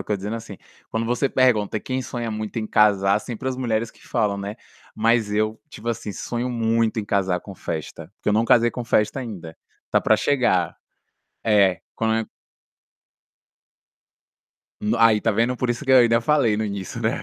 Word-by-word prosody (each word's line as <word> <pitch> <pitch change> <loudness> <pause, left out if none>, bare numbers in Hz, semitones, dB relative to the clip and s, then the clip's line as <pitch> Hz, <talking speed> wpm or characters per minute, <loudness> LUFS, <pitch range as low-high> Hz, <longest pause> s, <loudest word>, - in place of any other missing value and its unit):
estou 105 - -2
dizendo, 105 +4 -4
assim, 110 -3 -9 0.3
quando 110 +1 -2
você 125 +4 0
pergunta 110 -6 +2
quem 130 +4 -3
sonha 120 -2 -4
muito 110 +1 -4
em 110 - -3
casar, 100 -2 +3
sempre 120 +2 -7
as 130 - -3
mulheres 115 -3 -1
que - - -21
falam, 100 -2 0
né. 100 +1 -5 0.4
Mas 115 -1 +2
eu, 110 +1 0
tipo 150 - -12
assim, 110 -3 -3
sonho 120 +4 -3
muito 115 -2 +1
em - - -6
casar 95 -3 0
com 100 - -10
festa, 80 -1 -6
porque - - -4
eu - - +3
não 110 +2 +3
casei 120 0 +5
com 125 - -5
festa 110 +2 +1
ainda. 90 -10 -7 0.4
Tá - - +3
pra - - +3
chegar. 120 -11 +1 0.7
É, 100 -4 +3
quan 110 0 0 2.5
No 110 +3 0
aí, 115 -2 +5
tá 115 - +2
vendo? 115 +4 +1
Por 125 0 -1
isso 120 +4 -3
que - - +1
eu - - +8
ainda 115 -1 +4
falei 120 -4 +2
no 110 - -1
início, 100 -3 -5
né. - - +1
110 Hz, 180 wpm, -23 LUFS, 105-120 Hz, 2.5 s, eu